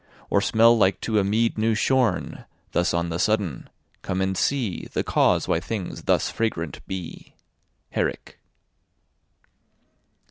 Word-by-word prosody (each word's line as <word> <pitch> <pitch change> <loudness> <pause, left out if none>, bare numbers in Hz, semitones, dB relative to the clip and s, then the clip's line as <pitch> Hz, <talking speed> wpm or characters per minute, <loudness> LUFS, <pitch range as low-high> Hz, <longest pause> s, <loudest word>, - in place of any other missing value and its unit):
Or 100 - +3
smell 115 +2 +5
like 100 -4 +2
to 110 -2 +1
a - - +2
meade 110 +3 +1
new 110 0 +2
shorne, 115 -3 0 0.3
Thus 90 +2 +1
on 85 0 -1
the 85 +1 -3
sudden? 100 - -1 0.3
Come 95 -1 -3
and 95 0 0
see 120 -1 -1
The - - 0
cause - - +2
why 80 - +1
things 100 0 -5
thus - - +2
fragrant 85 -10 -2
be. 95 -3 -7 0.6
HERRICK. - - -3
100 Hz, 135 wpm, -24 LUFS, 90-115 Hz, 0.6 s, smell